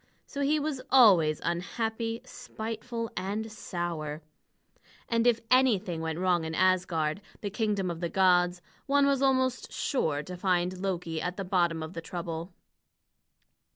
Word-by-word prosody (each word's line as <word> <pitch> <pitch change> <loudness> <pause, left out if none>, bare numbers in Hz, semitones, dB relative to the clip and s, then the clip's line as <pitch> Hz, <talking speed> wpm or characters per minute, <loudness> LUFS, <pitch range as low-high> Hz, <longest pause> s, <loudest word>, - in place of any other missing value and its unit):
So 285 - -5
he 295 +2 +2
was 290 -3 -2
always 185 - +6
unhappy, 225 +6 -2
spiteful, 230 +1 -5
and 205 +4 -3
sour. 165 -6 -4 0.8
And 230 0 +2
if 235 -2 +4
anything 215 -10 +3
went 160 -1 -3
wrong 180 -2 +2
in 160 0 -4
Asgard, 180 -3 +1 0.2
the 205 - -3
kingdom 205 -4 0
of 165 - -6
the 170 -1 -2
gods, 180 -1 +3 0.2
one 285 0 +4
was 280 -1 +2
almost 260 -2 +1
sure 155 - -1
to 180 +4 -7
find 180 0 0
Loki 175 -4 -2
at 180 0 -3
the 195 - -3
bottom 175 -3 +1
of 160 +2 -7
the 165 - -5
trouble. 170 0 -5
185 Hz, 145 wpm, -29 LUFS, 170-230 Hz, 0.8 s, always